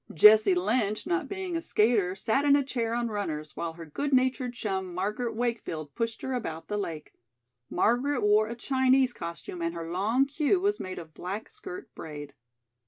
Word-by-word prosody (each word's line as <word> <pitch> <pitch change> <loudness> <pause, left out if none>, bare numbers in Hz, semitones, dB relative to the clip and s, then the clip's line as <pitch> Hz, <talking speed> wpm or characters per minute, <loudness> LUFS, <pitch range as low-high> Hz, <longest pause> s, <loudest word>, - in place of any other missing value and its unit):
Jessie 210 +2 +7
Lynch, 210 +3 0
not 355 0 0
being 380 -3 -3
a 330 - -1
skater, 210 - +2
sat 230 +7 +1
in 285 -1 +6
a 285 - +3
chair 235 -4 -2
on 240 -1 0
runners, 155 -8 -4
while 165 -1 -3
her 165 0 -9
good 280 - -3
natured 255 -1 +2
chum, 190 -5 -3
Margaret 215 +5 -2
Wakefield, 220 - -3
pushed 230 -1 -3
her 265 - -2
about 165 -10 -4
the 210 - -1
lake. 165 -6 -5 0.6
Margaret 245 +9 +2
wore 210 +1 +4
a 235 - -5
Chinese 260 0 +3
costume 170 0 -7
and 170 0 -1
her 165 0 -5
long 220 +9 +2
queue 300 +6 +1
was 405 +2 +1
made 185 0 -5
of 160 -2 -9
black 195 +7 -5
skirt 390 -2 -9
braid. 145 -2 -8
220 Hz, 180 wpm, -28 LUFS, 180-260 Hz, 0.6 s, Jessie